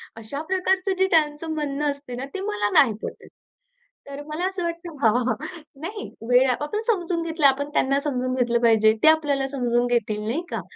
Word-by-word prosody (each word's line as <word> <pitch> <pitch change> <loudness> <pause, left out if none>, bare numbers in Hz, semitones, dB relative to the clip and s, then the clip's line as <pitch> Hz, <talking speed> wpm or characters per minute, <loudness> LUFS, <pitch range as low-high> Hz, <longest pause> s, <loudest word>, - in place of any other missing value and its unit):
अशा 225 +6 -6
प्रकारचं 380 +1 +1
जे 380 0 +3
त्यांचं 315 0 +1
म्हणणं 295 -1 -1
असतं 280 -3 -8
ना, 260 - -4
ते 390 - -4
मला 205 0 0
नाही 235 -6 +2
पटत. - - -7 0.8
तर 280 +1 -7
मला 310 +4 -3
असं 380 -1 -4
वाटतं 340 -1 -5
हां, 225 - +5
हां. 245 - +2 0.5
नाही, 410 +5 -6 0.2
वेळ 250 +1 +5
आपण 295 - -2
समजून 350 -6 0
घेतलं, 325 -2 -1
आपण 280 +2 0
त्यांना 275 +1 +2
समजून 255 -3 -2
घेतलं 240 -2 +1
पाहिजे. 220 -2 +5
ते - - +6
आपल्याला 295 -4 +3
समजून 245 -3 0
घेतील, 215 -3 0
नाही 270 +9 -1
का? - - -2
285 Hz, 185 wpm, -24 LUFS, 245-335 Hz, 0.8 s, ते